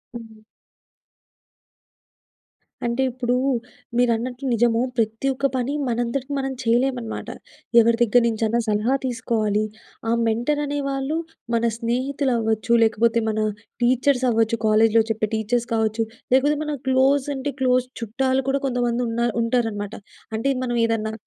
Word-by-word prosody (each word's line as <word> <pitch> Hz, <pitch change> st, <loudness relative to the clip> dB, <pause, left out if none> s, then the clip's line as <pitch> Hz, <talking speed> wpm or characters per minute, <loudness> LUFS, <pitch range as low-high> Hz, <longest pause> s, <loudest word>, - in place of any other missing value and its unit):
హ్మ్. 225 Hz, -2 st, -10 dB, 2.4 s
అంటే 235 Hz, +2 st, 0 dB
ఇప్పుడు, 245 Hz, 0 st, -1 dB, 0.6 s
మీరన్నట్టు 245 Hz, +2 st, 0 dB
నిజము, 235 Hz, 0 st, +2 dB, 0.2 s
ప్రతి 225 Hz, +3 st, 0 dB
ఒక్క 265 Hz, -, -3 dB
పని 255 Hz, +2 st, -1 dB
మనంతటికీ 245 Hz, +3 st, -2 dB
మనం 270 Hz, 0 st, -2 dB
చేయలేమనమాట. 240 Hz, 0 st, 0 dB, 0.5 s
ఎవరి 230 Hz, 0 st, +4 dB
దగ్గర 240 Hz, +1 st, +4 dB
నుంచైనా, 225 Hz, 0 st, 0 dB
సలహా 215 Hz, +5 st, +1 dB
తీసుకోవాలి. 225 Hz, -4 st, 0 dB, 0.5 s
ఆ -, -, +2 dB, 0.2 s
మెంటర్ 240 Hz, +7 st, 0 dB
అనే 290 Hz, 0 st, -2 dB
వాళ్ళు 275 Hz, +3 st, -2 dB, 0.4 s
మన 230 Hz, -, +1 dB
స్నేహితులు 260 Hz, +3 st, -1 dB
అవ్వచ్చు, 220 Hz, 0 st, -1 dB
లేకపోతే 225 Hz, +1 st, +2 dB
మన 215 Hz, 0 st, -1 dB, 0.4 s
టీచర్స్ 255 Hz, +1 st, +2 dB
అవ్వచ్చు. 225 Hz, 0 st, +2 dB
కాలేజ్‌లో 220 Hz, +1 st, +5 dB
చెప్పే 220 Hz, -1 st, 0 dB
టీచర్స్ 235 Hz, +2 st, -1 dB
కావచ్చు. 220 Hz, 0 st, +1 dB, 0.3 s
లేకపోతే 285 Hz, +3 st, +4 dB
మన 300 Hz, -, -3 dB, 0.2 s
క్లోజ్ 265 Hz, +1 st, +3 dB
అంటే 270 Hz, +2 st, -3 dB
క్లోజ్ 255 Hz, -1 st, +2 dB
చుట్టాలు 260 Hz, +4 st, 0 dB
కూడా, 275 Hz, 0 st, 0 dB
కొంతమంది 245 Hz, -1 st, 0 dB
ఉన్న 230 Hz, -, -4 dB, 0.2 s
ఉంటారనమాట. 225 Hz, -3 st, -1 dB, 0.4 s
అంటే, 225 Hz, +5 st, 0 dB
మనం 240 Hz, -1 st, -1 dB
ఏదన్నా 220 Hz, -1 st, -1 dB
235 Hz, 125 wpm, -23 LUFS, 225-260 Hz, 2.4 s, కాలేజ్‌లో